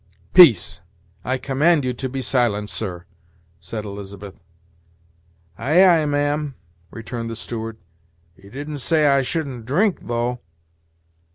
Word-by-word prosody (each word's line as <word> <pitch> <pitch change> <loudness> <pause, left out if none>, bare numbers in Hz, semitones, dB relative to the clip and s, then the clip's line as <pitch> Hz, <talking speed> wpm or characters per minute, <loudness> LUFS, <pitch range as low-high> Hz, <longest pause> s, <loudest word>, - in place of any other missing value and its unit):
"Peace 140 - +6 0.4
I 130 - -1
command 145 +3 +2
you 125 - -1
to 130 +2 -5
be 135 +1 -4
silent, 115 -5 0
sir!" 90 -5 -5 0.5
said 105 +5 -6
Elizabeth. 100 -1 -8 1.3
"Ay, 155 +11 +4
ay, 165 -4 +4
ma'am," 145 0 -1 0.3
returned 115 +2 -6
the 115 - -5
steward. 115 0 -6 0.6
"You 95 +2 -17
didn't 145 +5 -6
say 155 +3 +2
I 140 -1 +4
shouldn't 130 -5 -4
drink, 185 +9 0
though." 120 +1 -2
125 Hz, 120 wpm, -21 LUFS, 110-145 Hz, 1.3 s, Peace